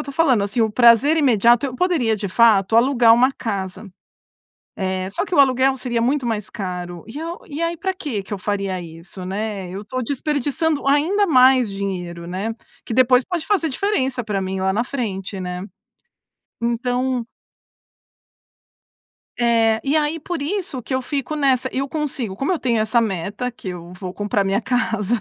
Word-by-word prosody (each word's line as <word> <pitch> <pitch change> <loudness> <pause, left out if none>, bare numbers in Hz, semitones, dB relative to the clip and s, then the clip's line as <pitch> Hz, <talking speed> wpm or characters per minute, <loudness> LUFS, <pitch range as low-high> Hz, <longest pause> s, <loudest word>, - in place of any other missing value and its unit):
estou 280 - -6
falando 265 -9 +3
assim 205 +4 -1
o 220 - +3
prazer 240 +7 +5
imediato 240 -3 +4
eu 255 - -6
poderia 260 -11 +1
de 200 -1 -4
fato, 215 -1 +4
alugar 235 -1 +5
uma 255 +3 +4
casa. 200 -4 -5 0.9
Eh, 185 -1 -2
só 350 - -1
que 370 - -7
o 335 - +4
aluguel 265 0 +4
seria 240 -2 -1
muito 260 +2 +1
mais 220 -3 -2
caro. 180 -3 -6
E 225 +6 -8
eu 335 +2 -5
e 300 +1 -5
aí 335 0 -1
pra 380 +3 -2
que 275 - -4
que 205 - -7
eu 205 - -2
faria 195 -2 -2
isso, 165 +3 -9
né? 200 -1 -4
Eu 195 +2 -6
estou 255 +4 -4
desperdiçando 290 +3 -1
ainda 330 +9 +3
mais 255 - +5
dinheiro, 180 -4 -5
né? 195 +6 -3 0.3
Que 230 - -4
depois 255 +1 +4
pode 340 0 -4
fazer 385 -6 +1
diferença 265 -6 -1
para 205 -3 -2
mim 190 0 -3
lá 190 0 +1
na 230 - +1
frente, 205 -7 -4
né? 180 0 -4 1.0
Então 245 +1 -1 2.1
É. 230 -2 +3
E 280 +2 +1
aí, 310 +1 +1
por 330 0 -4
isso 325 -5 -3
que 260 - -6
eu 260 - +1
fico 280 +2 -3
nessa, 265 -3 +2
eu 275 +1 -2
consigo, 270 -9 -3
como 275 - -1
eu 355 - 0
tenho 235 -3 +1
essa 220 +2 +2
meta 205 +3 -2
que 215 -5 -8
eu 175 -1 -8
vou 180 0 -7
comprar 205 0 0
minha 195 +3 0
casa, 225 -2 0
235 Hz, 175 wpm, -21 LUFS, 200-275 Hz, 2.1 s, prazer